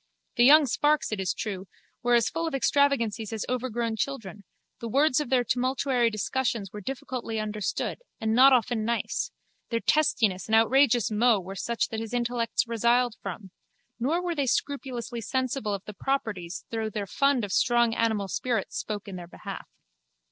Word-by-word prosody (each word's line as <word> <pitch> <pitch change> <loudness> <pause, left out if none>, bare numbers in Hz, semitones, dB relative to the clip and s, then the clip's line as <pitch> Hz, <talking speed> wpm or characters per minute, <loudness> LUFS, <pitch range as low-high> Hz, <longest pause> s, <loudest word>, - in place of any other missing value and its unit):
The 240 - +4
young 300 +3 +8
sparks, 295 +3 +1
it 215 - -2
is 190 -1 0
true, 195 -3 -5 0.3
were 240 0 +3
as 235 -2 +3
full 330 0 -2
of 315 - -2
extravagancies 245 -5 +1
as 220 -1 -3
overgrown 240 -2 -2
children: 210 -7 -4 0.3
the 235 - -5
words 280 +3 +3
of 300 - -3
their 255 -1 +3
tumultuary 255 0 +1
discussions 215 -1 -2
were 210 - -7
difficultly 245 -2 -4
understood 210 -2 -3 0.2
and 220 0 0
not 260 +4 +7
often 240 -3 +2
nice: 235 +1 -1 0.4
their 230 - 0
testiness 220 - +1
and 220 - +2
outrageous 240 0 +4
mots 215 -3 +3
were 190 - -6
such 235 +4 -1
that 220 - -4
his 225 +2 -5
intellects 235 -1 0
resiled 235 +1 +2
from: 195 0 -7 0.5
nor 315 +9 0
were 350 -1 -1
they 285 -4 -1
scrupulously 250 -3 -2
sensible 255 -3 -1
of 195 - -9
the 210 - -8
proprieties 205 -9 -3
though 225 -1 -2
their 210 -1 -4
fund 275 +2 +1
of 200 - -8
strong 240 -2 +3
animal 220 -4 0
spirits 230 +1 -2
spoke 210 -1 -5
in 190 -2 -6
their 175 -1 -8
behalf. - - -8
235 Hz, 170 wpm, -27 LUFS, 215-260 Hz, 0.5 s, young